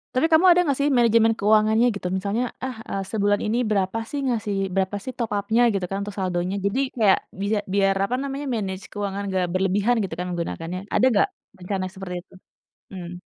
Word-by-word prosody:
Tapi 255 - +3
kamu 320 +4 +5
ada 350 0 +6
nggak 280 -3 +1
sih 285 +1 +2
manajemen 230 -1 +4
keuangannya 215 +3 +4
gitu, 180 - -4
misalnya, 205 +5 -1 0.2
"Ah, 260 - -4
eee, 195 0 -2
sebulan 205 -1 +2
ini 220 +3 0
berapa 200 +1 0
sih 290 - -2
ngasih 215 -4 -1 0.2
berapa 195 +1 0
sih 260 - -5
top 235 -3 -2
up-nya" 225 +4 +1
gitu 190 -2 -1
kan, 195 - -2
"untuk 205 0 -6
saldonya." 185 0 -1
Jadi 200 +7 +1 0.2
kayak 205 -4 +4 0.2
bisa 205 +1 +1 0.2
biar 195 -1 +3
apa 245 - -1
namanya, 280 +1 -4
manage 190 -3 -3
keuangan 200 -1 -3
nggak 185 -1 +1
berlebihan 195 +5 +2
gitu 185 - -4
kan 180 - -3
menggunakannya, 170 +1 -4
ada 255 - +4
nggak 200 - +4 0.3
rencana 185 0 -2
seperti 190 -2 -6
itu? - - -25 0.6
Mmm. 175 0 -7
200 Hz, 195 wpm, -24 LUFS, 190-230 Hz, 0.6 s, ada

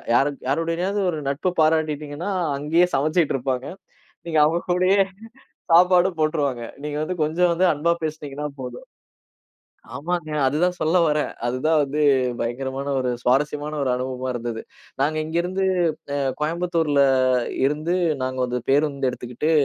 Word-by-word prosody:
யாரு 140 +3 +3 0.2
யாருடையனாவது 165 +7 0
ஒரு 160 - -4
நட்பு 155 +6 -1
பாராட்டிட்டீங்கன்னா, 155 +2 0 0.3
அங்கயே 165 +5 +2
சமைச்சிட்டு 155 +2 +1
இருப்பாங்க. 130 0 -2 0.6
நீங்க 160 -2 +2
அவங்க 170 +3 +1
கூடயே 185 +3 +3 0.7
சாப்பாடும் 180 0 +5
போட்டுருவாங்க. 145 -6 0 0.2
நீங்க 150 0 -3
வந்து 180 +2 -4
கொஞ்சம் 170 +3 +2
வந்து 180 +2 +3
அன்பா 170 +4 +1
பேசுனீங்கன்னா 150 -2 -5
போதும். - - -8 1.1
ஆமாங்க. 170 0 -3
அதுதான் 170 +7 +1
சொல்ல 160 +3 +1
வரேன். 150 0 +1 0.2
அதுதான் 130 +6 +1
வந்து 145 +2 -2 0.4
பயங்கரமான 130 +4 -3
ஒரு 125 -1 -1
சுவாரஸ்யமான 145 +4 0
ஒரு 130 - +1
அனுபவமா 130 0 -3
இருந்தது. 115 -1 -4 0.4
நாங்க 150 +3 +1
இங்க 160 +2 -4
இருந்து 185 +2 -2 0.5
அ, - - -1 0.2
கோயம்புத்தூர்ல 165 -2 +1 0.6
இருந்து 150 +5 0 0.3
நாங்க 130 0 -3
வந்து 125 0 -2
பேருந்து 140 -1 +2
எடுத்துக்கிட்டு 125 +6 -3
150 Hz, 130 wpm, -23 LUFS, 135-170 Hz, 1.1 s, சாப்பாடும்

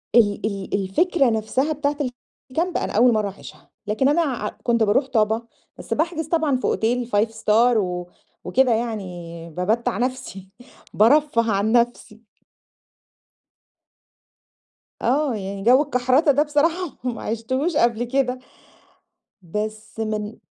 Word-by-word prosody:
ال 210 -4 +3
ال 200 -3 -4
الفكرة 250 - +2
نفسها 225 +7 0
بتاعة 290 0 -1 0.5
الكامب، 340 +6 -1
أنا - - -3
أول 235 +3 +5
مرّة 210 -2 0
أعيشها، 195 - -13 0.2
لكن 220 +6 +2
أنا 335 +4 +3
ع 245 -9 -2
كنت 235 -2 +2
باروح 220 +6 +2
طابا 225 -1 0 0.3
بس - - -4
باحجز 320 0 -1
طبعًا 315 -4 +1
في 255 - -11
أوتيل 240 +2 0
5-star 225 +2 +3
و 180 -3 -2 0.3
وكده 250 +7 +2
يعني 180 -7 -5
بامتّع 190 +6 -1
نفسي، 245 -6 -4 0.4
بارفه 230 0 +3
عن 200 +2 +1
نفسي. 235 -2 0 2.8
آه، 270 0 +1
يعني 195 0 -5
جو 255 +4 +6
الكحرته 260 +3 +2
ده 285 +2 +3
بصراحة 320 +3 0
ما 245 -2 -3
عِشتهوش 260 +9 -2
قبل 235 -4 +2
كده، 255 0 -1 1.0
بس 215 +5 -5
من 215 0 -4
235 Hz, 125 wpm, -22 LUFS, 210-270 Hz, 2.8 s, جو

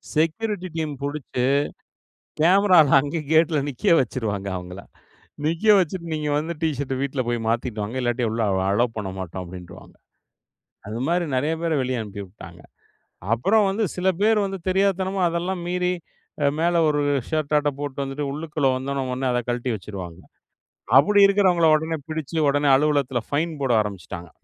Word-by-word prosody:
Security 185 +5 0
team 155 -2 -2
புடிச்சு 140 -3 -3 1.0
கேமராவ்ல 180 -3 +5
அங்கே 145 +4 -3
கேட்ல 160 0 +4
நிக்க 135 +4 +2
வச்சுடுவாங்க 110 -6 -2
அவங்கள. 90 +1 -8 0.7
நிக்க 165 +6 -1
வச்சுட்டு 180 -1 -1
"நீங்க 155 -1 -2
வந்து 160 +3 -3
ட் - - +3
ஷர்ட்ட 135 -2 -2
வீட்ல 140 -1 -2
போய் 120 0 0
மாத்திட்டு 115 -1 -1
வாங்க 105 +5 -5
இல்லாட்டி 120 0 0
உள்ள 115 +1 -3 0.3
அலோ 110 +5 +3
பண்ணமாட்டோம்" 95 -3 -5
அப்படின்றுவாங்க. 90 0 -11 0.9
அது 110 +2 -5
மாதிரி 175 +1 +1
நறைய 145 +5 +1
பேரை 165 -2 0
வெளியே 130 -1 -2
அனுப்பி 100 -1 -7
விட்டாங்க. 90 -2 -13 0.7
அப்புறம் 200 - +3
வந்து 205 +3 -1
சில 180 +1 -1
பேர் 215 0 +3
வந்து 195 -1 -5
தெரியாத்தனமா 190 0 +1
அதெல்லாம் 175 +2 -2
மீறி, 180 0 0 0.7
மேல 170 +1 +2
ஒரு 145 -1 +1 0.3
ஷர்ட்டாட்ம் 150 -2 0
போட்டு 140 -1 -3
வந்துட்டு 140 +1 -4
உள்ளுக்குள்ள 150 -1 -1
வந்த 130 +1 -4
ஓன்னே, 135 -1 -1
ஓன்னே 130 +1 -2
அத 125 0 0
கழட்டி 120 +1 -1
வச்சுருவாங்க. 95 -4 -8 0.8
அப்டி 200 +9 +5
இருக்கறவங்கள 185 -4 +3
ஓடனே 160 +1 -1
புடிச்சு 155 0 -4
ஓடனே 145 0 +2
அலுவலகத்தில 140 -3 +1
பைன் 160 +3 0
போட 135 -2 +1
ஆரம்பிச்சுட்டாங்க. 90 -4 -7
145 Hz, 145 wpm, -23 LUFS, 120-170 Hz, 1.0 s, கேமராவ்ல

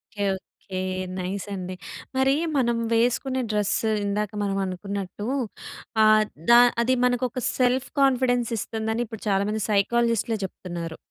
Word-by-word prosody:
Okay. 205 -1 -1
Okay. 185 0 -8 0.4
Nice 185 +2 -3
అండి. 185 -1 -5 0.4
మరీ 265 +1 +4 0.2
మనం 240 -4 +2 0.2
వేసుకునే 250 +3 +1
డ్రెస్ 210 -1 +1 0.3
ఇందాక 205 0 -1
మనం 195 -1 -1
అనుకున్నట్టూ, 195 +2 -5 0.8
ఆహ్, 215 0 +6 0.3
ద - - +8 0.3
అది 245 +2 +2
మనకు 245 0 +1
ఒక 250 +2 -5 0.2
సెల్ఫ్ 255 +1 +2
కాన్ఫిడెన్స్ 250 -3 +3
ఇస్తుందని, 220 +2 -2
ఇప్పుడు 225 -1 -9
చాలామంది 205 +2 +1
సైకాలజిస్ట్‌లే 230 +2 +2
చెప్తున్నారు. 170 -3 -6
215 Hz, 125 wpm, -25 LUFS, 195-245 Hz, 0.8 s, ద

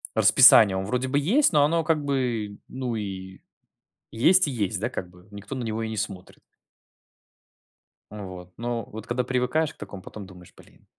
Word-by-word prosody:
расписания. 100 -3 +7
Он 95 - -3
вроде 125 +5 -2
бы 135 +2 -1
есть, 230 - +2
но 145 -2 +4
оно 165 +3 +1
как 155 -2 0
бы, 120 -7 -2
ну, 125 -2 -4
и 95 -2 -7 0.7
есть 175 +10 +4
и - - -3
есть, 105 -5 -2
да, 115 +4 -2
как 95 - -6
бы. 90 +2 -20
Никто 100 +5 -9
на 130 - -4
него 115 0 -3
и 110 - -4
не 110 - -6
смотрит. 100 -3 -5 1.7
Ну 105 -2 -8
вот, 90 -1 -11
но 120 0 -3
вот 110 +1 -9
когда 125 +1 -1
привыкаешь 130 +5 -1
к - - -32
такому, 100 - -10
потом 105 -2 -10
думаешь: 90 -2 -16
"Блин". - - -21
115 Hz, 185 wpm, -24 LUFS, 100-130 Hz, 1.7 s, расписания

